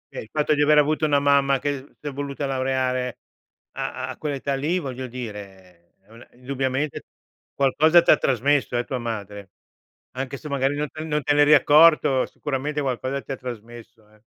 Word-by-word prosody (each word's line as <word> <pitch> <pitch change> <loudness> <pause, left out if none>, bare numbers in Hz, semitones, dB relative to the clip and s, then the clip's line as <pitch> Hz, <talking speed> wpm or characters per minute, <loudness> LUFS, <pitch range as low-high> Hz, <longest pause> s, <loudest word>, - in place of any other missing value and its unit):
Okay, - - -5
il - - -23
fatto 150 0 +1
di 145 - +1
aver 150 +1 +4
avuto 155 +1 +3
una 145 -1 +3
mamma 140 -1 +3
che 140 0 -5
s'è 145 -1 -5
voluta 140 +1 -4
laureare 130 -1 -1 0.5
a - - -5
a - - -7
quell'età 140 -2 -3
lì, 150 +6 -1
voglio 130 -4 -6
dire 100 -8 -10
è 95 - -32
una 115 +1 -15
indubbiamente 135 +3 -3 0.5
qualcosa 155 +5 +4
t'ha - - +6
trasmesso, 135 0 +1
eh, 120 - 0
tua 130 -2 -4
madre 105 -4 -6 0.6
anche 130 +1 -5
se 155 - -10
magari 140 0 0
non 150 0 -2
te 155 - -7
non 150 -2 -2
te 145 - +2
n'eri 145 +1 +6
accorto, 150 -2 +5
sicuramente 145 +2 -4
qualcosa 130 0 -2
ti - - -9
ha 130 - -6
trasmesso, 115 -2 -10
eh. 110 0 -25
135 Hz, 175 wpm, -23 LUFS, 125-145 Hz, 0.6 s, t'ha